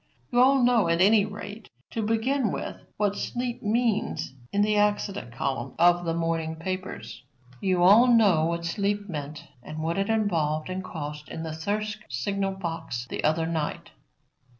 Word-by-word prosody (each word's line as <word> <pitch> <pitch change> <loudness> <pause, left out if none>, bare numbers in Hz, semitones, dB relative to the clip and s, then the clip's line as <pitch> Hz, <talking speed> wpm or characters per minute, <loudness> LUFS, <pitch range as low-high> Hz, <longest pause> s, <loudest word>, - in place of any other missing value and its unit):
You 245 - +3
all 265 +1 +5
know, 240 -6 +4
at 170 0 +2
any 205 +2 +5
rate, 205 +1 -8 0.2
to 225 - -2
begin 225 +2 +1
with, - - -4 0.2
what 205 -1 +1
sleep 245 +1 -3
means 220 - 0 0.2
in 205 +1 +2
the 210 0 +2
accident 205 - 0
column 135 +1 -3
of 175 +1 +4
the 165 - 0
morning 165 -1 -1
papers. 185 +3 -5 0.4
You 185 -2 +2
all 210 +7 +7
know 205 -10 +5
what 170 0 -2
sleep 205 +3 -1
meant 150 -4 -6 0.2
and 155 +5 -6
what 165 +4 -1
it 195 +2 -1
involved 165 -8 0
and 185 +1 -3
cost 150 -3 -6
in 160 - -5
the 160 -1 -4
Thirsk 210 +6 -2
signal 195 +10 -1
box 165 -9 -4
the - - -3
other 160 +2 +2
night. 160 -2 -3
190 Hz, 165 wpm, -26 LUFS, 160-210 Hz, 0.4 s, all